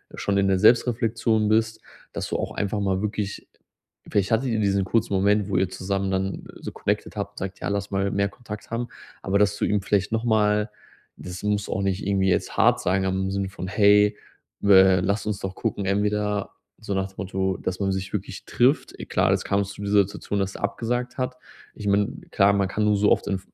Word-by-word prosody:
schon 100 -1 -1
in 100 0 +3
der 95 -1 +2
Selbstreflexion 115 -1 +3
bist, 110 0 +1 0.3
dass - - -4
du - - -1
auch - - -3
einfach 105 +1 -2
mal 95 -1 0
wirklich 105 -1 -3 0.6
vielleicht 100 0 +1
hattet 115 +4 +2
ihr 115 -2 0
diesen 100 -2 +2
kurzen 110 +2 0
Moment, 100 +1 +2
wo 100 - -2
ihr 95 0 +2
zusammen 95 +1 -2
dann 95 0 -2 0.2
so - - -7
connected - - -2
habt - - -4
und - - -39
sagt: 95 0 -6
„Ja, - - -2
lass 100 0 -2
mal 100 0 0
mehr 100 0 +1
Kontakt 105 -1 -9
haben.“ 115 +1 -2 0.3
Aber 100 +1 +1
dass 105 0 +3
du - - -3
ihm 105 -1 +1
vielleicht 100 +1 0
noch 115 0 0
mal 105 -2 +2 0.5
das 90 +1 -8
muss 105 -1 -1
auch 95 - -1
nicht 95 0 -1
irgendwie 95 -1 +2
jetzt - - -1
hart - - +4
sein, 95 +1 +1
aber 95 0 0
im 95 0 -1
Sinn 100 0 -1
von: 95 -1 -7
„Hey, 105 +1 +4 0.4
we 95 -2 +6
lass 100 +3 -1
uns 105 -2 -2
doch 95 -1 -5
gucken 100 - -2
entweder“, 105 +1 0 0.3
so 100 - -4
nach 95 0 0
dem 95 - -18
Motto, 95 -1 -2
dass 90 0 -4
man 100 -1 0
sich 95 +1 -4
wirklich 95 -2 -5
trifft. 130 +5 +2
E - - -6
klar, - - +2
jetzt - - 0
kam's 100 0 0
zu - - -11
dieser 100 0 +3
Situation, 100 +1 -4
dass 95 0 -1
der - - -9
abgesagt 120 +4 -2
hat. 125 0 -2 0.4
Ich 105 - -6
meine, 100 0 +3 0.2
klar, 100 +1 +4
man 100 -1 +1
kann 105 +3 -2
nur 105 -1 +3
so 105 +1 +3
oft - - +2
in 95 - 0
v 95 - -23
100 Hz, 225 wpm, -24 LUFS, 95-105 Hz, 0.6 s, we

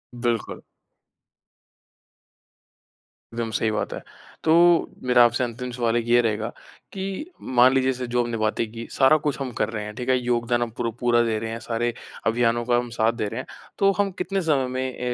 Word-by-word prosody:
बिल्कुल। 120 -2 -2 2.7
विम 115 -1 -2
सही 110 +1 0
बात 105 - -2
है। - - -6 0.4
तो 160 - +2 0.5
मेरा 125 -1 +5
आपसे 120 +2 +1
अंतिम 125 +1 -4
सवाल 120 -2 0
एक 115 - -1
ये 120 +1 +5
रहेगा 110 -1 -1 0.4
कि 195 - -5 0.3
मान 125 +2 +7
लीजिए 130 0 +2
जैसे 125 -1 -4
जो 120 0 +1
हमने 120 -1 -3
बातें 110 +1 0
की, 115 0 -7
सारा 135 +3 +5
कुछ 150 -1 -2
हम 130 -2 -3
कर 105 - +1
रहे 110 -2 -4
हैं, 105 0 -8
ठीक 125 +2 -5
है। 130 - +4
योगदान 120 -1 0
हम 120 - 0
पुर 115 -1 -1
पूरा 120 -1 +3
दे 115 -2 0
रहे 115 +1 -4
हैं, 115 - -5
सारे 120 +1 -2 0.3
अभियानों 120 +1 +1
का 120 0 +3
हम 120 0 -2
साथ 110 +1 +4
दे 115 -3 -2
रहे 115 - -5
हैं। - - -14 0.3
तो 195 0 +5
हम 200 -1 +1
कितने 195 +1 -1
समय 145 -6 +1
में 130 0 -4
120 Hz, 195 wpm, -24 LUFS, 115-130 Hz, 2.7 s, मान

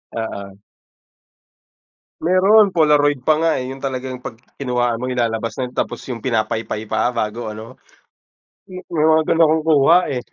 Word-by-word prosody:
Oo. 100 -3 -6 1.6
Mayro'n 195 +5 +4
polaroid 150 -4 +3
pa 155 - +5
nga, 165 0 +2
eh, 125 - -4
'yon 135 +1 -8
talagang 130 -1 -5
pag 115 - -8 0.2
kinuhaan 120 -2 -1
mo 130 - -3
ilalabas 115 -2 -2
na 125 -1 -4
tapos - - -3
yung 120 -4 -6
pinapaypay 110 -2 -2
pa 110 +3 0
bago 110 -1 -3
ano. 110 +4 -10 0.9
May 175 -4 -3
mga 160 0 +3
gano'n 165 0 +4
akong 155 0 +1
kuha, 160 +1 +5
eh. 125 - -2
130 Hz, 145 wpm, -19 LUFS, 115-155 Hz, 1.6 s, pa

